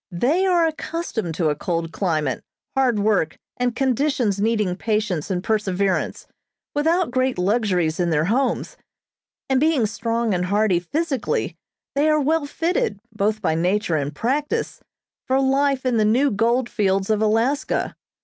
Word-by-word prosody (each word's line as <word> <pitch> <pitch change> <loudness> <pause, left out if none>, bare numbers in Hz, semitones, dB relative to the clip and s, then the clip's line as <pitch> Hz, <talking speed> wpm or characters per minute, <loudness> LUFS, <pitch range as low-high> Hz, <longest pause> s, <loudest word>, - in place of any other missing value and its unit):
They 300 - +2
are 350 -2 +4
accustomed 315 - -3
to 160 -3 +1
a - - -1
cold 165 0 -2
climate, 155 - -1 0.3
hard 260 -4 +2
work, 200 -8 +1 0.2
and 245 -1 0
conditions 255 -6 +1
needing 210 -4 +1
patience 210 -6 -1
and 180 -1 -2
perseverance, 200 -3 0 0.5
without 325 +1 +1
great 255 -1 0
luxuries 180 -4 +1
in 175 -1 +1
their 155 -1 +2
homes, 265 - 0 0.7
and 265 -1 +2
being 300 -5 +3
strong 230 0 -1
and 180 0 0
hearty 200 -1 +2
physically, 275 - -2 0.4
they 290 +2 +2
are 305 0 +3
well 300 +1 +1
fitted, 325 - -1
both 215 +1 -1
by 160 - +2
nature 180 +2 +1
and 145 0 -2
practice, 280 - -1 0.5
for 265 +1 +2
life 270 0 +1
in 250 -2 +2
the 215 - +3
new 250 +7 +3
gold 235 +4 +1
fields 195 -2 0
of 215 0 +1
Alaska. 225 +7 +1
220 Hz, 150 wpm, -22 LUFS, 185-270 Hz, 0.7 s, are